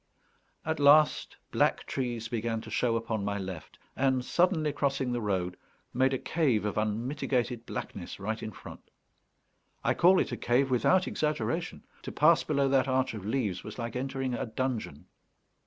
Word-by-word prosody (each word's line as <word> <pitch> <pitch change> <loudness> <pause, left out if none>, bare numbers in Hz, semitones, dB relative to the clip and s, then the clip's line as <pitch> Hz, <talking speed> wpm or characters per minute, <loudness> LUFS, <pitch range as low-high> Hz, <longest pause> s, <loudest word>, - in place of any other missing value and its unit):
At 160 0 -1
last 145 +1 +4
black - - +1
trees 120 -3 -3
began 115 -1 -2
to 110 - -10
show 115 +1 +1
upon 115 -2 -2
my 100 0 -1
left, 95 -4 -7 0.2
and, 130 -2 +1
suddenly 160 -2 +2
crossing 135 -3 0
the 120 -1 -1
road, 90 -4 -1 0.4
made 130 +2 +3
a 130 - 0
cave 130 -9 0
of 105 - -2
unmitigated 120 +2 -1
blackness - - -6
right 110 +3 -3
in 110 - -5
front. - - -11 1.0
I - - +2
call 185 +2 +5
it - - 0
a 120 - -3
cave 130 +2 +1
without 180 +9 +3
exaggeration; 155 +3 -2 0.2
to - - -6
pass 160 +2 +4
below 140 -2 +1
that 135 -1 +3
arch 130 -1 +1
of 105 -2 -7
leaves 110 -7 -1
was - - -8
like 115 -1 -5
entering 135 0 -2
a 120 - -3
dungeon. 110 - -3
125 Hz, 165 wpm, -29 LUFS, 110-140 Hz, 1.0 s, call